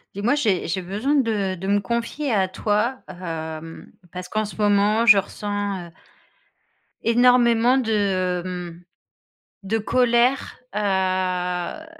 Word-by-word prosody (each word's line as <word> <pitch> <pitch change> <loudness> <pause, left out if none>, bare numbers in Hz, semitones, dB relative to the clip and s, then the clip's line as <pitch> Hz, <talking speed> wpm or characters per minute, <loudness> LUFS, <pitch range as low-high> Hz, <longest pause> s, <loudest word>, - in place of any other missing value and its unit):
Dis 200 - -5
moi, 240 - +3
j'ai 220 -11 0
j'ai 180 +3 -2
besoin 205 +10 -2
de 220 -9 +1
de 185 +1 -6
me 200 +1 +3
confier 235 +6 -2
à 190 -3 +2
toi, 210 +6 -1
hem, 165 -2 -7 0.2
parce 180 0 -7
qu'en 215 0 -1
ce 210 - -7
moment, 210 +2 +2
je 215 -4 +8
ressens, 205 -2 -4
heu - - -16 1.1
énormément 240 +1 +4
de, 195 -7 0
hem, 180 -1 -7 0.8
de 205 +3 -1
colère, 245 +3 +1 0.2
heu, 185 - -1
205 Hz, 125 wpm, -22 LUFS, 185-230 Hz, 1.1 s, je